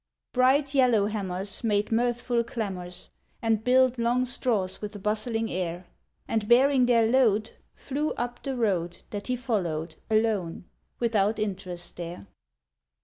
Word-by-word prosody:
Bright 260 +3 +4
yellowhammers 205 -7 +1
Made 210 -1 +1
mirthful 240 +1 +1
clamours, 190 -7 -5 0.3
And 225 -1 +1
billed 255 0 +4
long 240 +2 +2
straws 220 -7 -1
with 210 0 -6
a - - -4
bustling 220 +2 -1
air, 175 0 -3 0.4
And 220 -2 -1
bearing 255 +1 +5
their 230 -2 +4
load 225 -3 +3 0.2
Flew 295 +3 -2
up 240 0 -4
the 270 -2 -3
road 185 -7 -1
That 205 -1 -5
he 250 - 0
followed, 175 -10 -2
alone, 215 -6 0 0.3
without 220 -3 +2
interest 185 -4 -4
there. 170 - -6
220 Hz, 130 wpm, -27 LUFS, 195-245 Hz, 0.4 s, bearing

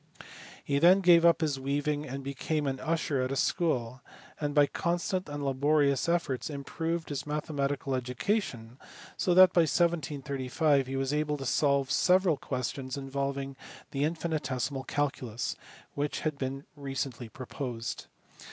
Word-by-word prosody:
He 140 0 +1
then 180 +5 +6
gave 175 -2 +6
up 170 0 +5
his 145 -4 0
weaving, 145 +2 -1
and 135 +1 -5
became 140 +3 -2
an 135 -1 -2
usher 155 -4 0
at 130 +1 -1
a - - -1
school, 130 -5 0 0.4
and 145 -1 -2
by 145 -1 +7
constant 175 +3 -2
and 145 -1 -4
laborious 140 +1 +2
efforts 165 -7 0
improved 160 +3 -3
his 145 0 -4
mathematical 145 -2 -2
education 125 - -2 0.4
so 180 - +1
that 185 -1 +8
by 175 - +5
1735 145 -3 +1
he 135 - -4
was 135 +1 -1
able 150 0 0
to 135 - -6
solve 140 0 +2
several 185 -2 +4
questions 130 +1 -4
involving 135 0 -3 0.4
the 140 - -2
infini 160 +1 0
tesimal 130 0 -3
calculus, 130 -5 -2 0.4
which 145 +1 -2
had 155 -2 -1
been 135 +1 -4
recently 135 -4 -4
proposed. 120 -1 -5
140 Hz, 145 wpm, -30 LUFS, 135-155 Hz, 0.4 s, that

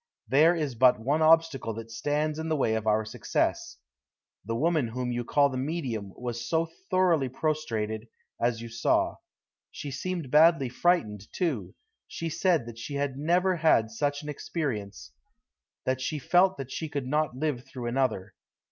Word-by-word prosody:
There 155 +6 +5
is 150 -5 -2
but 125 0 +5
one 140 +7 0
obstacle 155 -8 +3
that 115 0 -8
stands 150 +5 -1
in 160 0 -3
the 160 - +2
way 130 -6 +1
of 110 -1 -2
our 110 0 +2
success. 110 - -2 0.7
The 115 +2 -3
woman 155 0 +1
whom 125 +2 -3
you 120 0 -2
call 140 +4 +3
the 130 - -4
medium 130 - -3
was 120 -1 -5 0.4
thoroughly 175 -8 +3
prostrated, 115 -7 -2 0.3
as 115 -1 +1
you - - -6
saw. 115 0 +1 0.5
She 145 - -7
seemed 165 0 -4
badly 155 -3 +5
frightened, 115 - +1
too. 125 - -2 0.3
She 165 - -4
said 165 -4 +1
that 115 -1 -9
she 140 +4 -6
had 140 -1 -1
never 175 +6 +2
had 135 -9 +3
such 145 +5 -1
an 150 - -6
experience: 105 - -4 0.7
that 130 0 0
she 150 +4 -2
felt 180 +6 +3
that 135 -1 -7
she 160 - -4
could 140 -3 -3
not 150 0 0
live 140 -4 -1
through 125 -2 -8
another. 120 -6 -1
135 Hz, 165 wpm, -28 LUFS, 115-155 Hz, 0.7 s, There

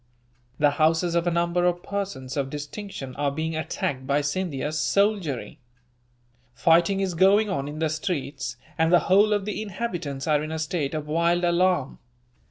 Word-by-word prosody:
The 145 -1 +4
houses 165 +2 +3
of 170 0 +1
a - - +2
number 170 +1 +1
of 175 0 0
persons 195 -11 -4
of 140 -2 -1
distinction 145 -2 -7
are 145 0 +1
being 160 +3 -3
attacked 135 -4 -3
by 140 +2 +2
Scindia's 150 -1 -2
soldiery. 195 - 0 1.0
Fighting 170 +7 +3
is 190 -2 -1
going 200 +4 +4
on 140 -3 -2
in 150 +1 -6
the 160 0 +1
streets, 145 -5 -3 0.2
and 160 +1 +3
the 175 - +6
whole 205 +3 +4
of 205 -2 +1
the 210 0 -3
inhabitants 175 -10 -4
are 150 -2 +2
in 155 +1 -5
a 160 - -2
state 155 -2 -2
of 155 -1 -3
wild 170 +3 +1
alarm. 175 -4 +1
165 Hz, 170 wpm, -25 LUFS, 145-185 Hz, 1.0 s, the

